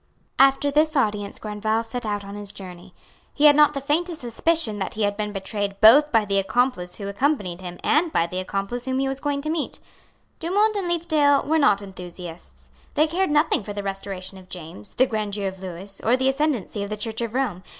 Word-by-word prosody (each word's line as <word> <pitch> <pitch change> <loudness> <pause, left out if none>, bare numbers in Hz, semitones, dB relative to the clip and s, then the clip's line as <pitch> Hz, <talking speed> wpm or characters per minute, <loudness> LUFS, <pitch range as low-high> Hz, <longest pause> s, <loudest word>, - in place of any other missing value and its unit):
After 275 +1 +5
this 305 +2 +2
audience 210 -6 0
Grandval 215 +1 -1
set 230 0 -5
out 205 -1 -2
on 200 - -8
his 205 -1 -7
journey. 185 -2 -11 0.4
He 295 - +3
had 295 -1 +8
not 295 0 +5
the - - -1
faintest 320 +4 -1
suspicion 240 -1 0
that 190 - -4
he 215 - -1
had 205 0 +1
been 210 0 -3
betrayed 200 0 -3
both 285 +8 +7
by 225 -3 +3
the 200 -1 +1
accomplice 195 -4 0
who 200 - -6
accompanied 200 - -1
him 175 -1 -7
and 320 +2 +2
by 165 - +2
the 180 +2 -4
accomplice 195 +6 -3
whom 260 0 -1
he 270 0 +1
was 270 0 -2
going 285 0 -2
to 310 - -1
meet. 320 -2 -3 0.6
Dumont 410 +6 +2
and 390 -3 -1
Leefdale 310 -5 +2
were 320 +1 +2
not 205 -9 +3
enthusiasts. 170 - -10 0.2
They 305 - +4
cared 360 +4 0
nothing 295 -2 +2
for 205 - -6
the 205 0 -5
restoration 195 -1 -5
of 185 0 -17
James, 160 - -8
the 260 - +4
grandeur 210 -4 -2
of 190 0 -6
Lewis, 190 +2 -6
or 240 +3 +3
the 260 +1 +2
ascendency 270 -7 -1
of 200 - -4
the 215 - -4
Church 220 +2 -4
of 230 0 -4
Rome. 245 -9 -1
215 Hz, 210 wpm, -23 LUFS, 195-285 Hz, 0.6 s, had